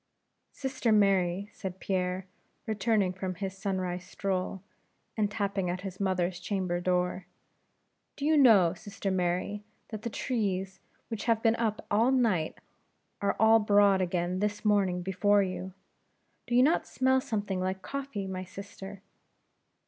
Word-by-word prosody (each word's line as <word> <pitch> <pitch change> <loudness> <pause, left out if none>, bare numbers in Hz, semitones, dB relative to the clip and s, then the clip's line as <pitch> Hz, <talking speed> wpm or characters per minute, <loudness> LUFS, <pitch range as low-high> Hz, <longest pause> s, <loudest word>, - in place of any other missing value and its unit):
"Sister 265 -4 -1
Mary," 195 -2 +3
said 190 -1 -6
Pierre, 185 -1 -1 0.4
returned 215 -4 +1
from 185 -1 -3
his 190 +1 -4
sunrise 185 -2 -2
stroll, 185 0 -3 0.5
and 210 -2 +1
tapping 200 -3 -1
at 180 +1 -3
his 185 -1 -7
mother's 185 -2 0
chamber 185 -2 -2
door: 180 0 0 0.9
"do 285 - -4
you 310 +1 +4
know, 215 - +6
sister 200 0 -5
Mary, 185 +3 -1 0.3
that 215 -2 -6
the 235 - -3
trees 195 -5 -2 0.3
which 225 -2 -4
have 225 -1 +2
been 225 -1 +4
up 220 -2 -1
all 225 +4 +4
night, 220 -12 +1 0.6
are 200 - +1
all 220 +1 +7
abroad 205 -2 +4
again 180 0 -1
this 210 +1 -2
morning 195 -4 +2
before 205 +2 +3
you? 185 0 -4 0.8
Do 240 - 0
you 250 - +6
not 310 +5 +2
smell 260 0 +2
something 205 -5 -2
like 190 +1 -2
coffee, 275 -8 -4
my 185 -1 -4
sister?" 195 +1 -10
195 Hz, 140 wpm, -29 LUFS, 185-215 Hz, 0.9 s, all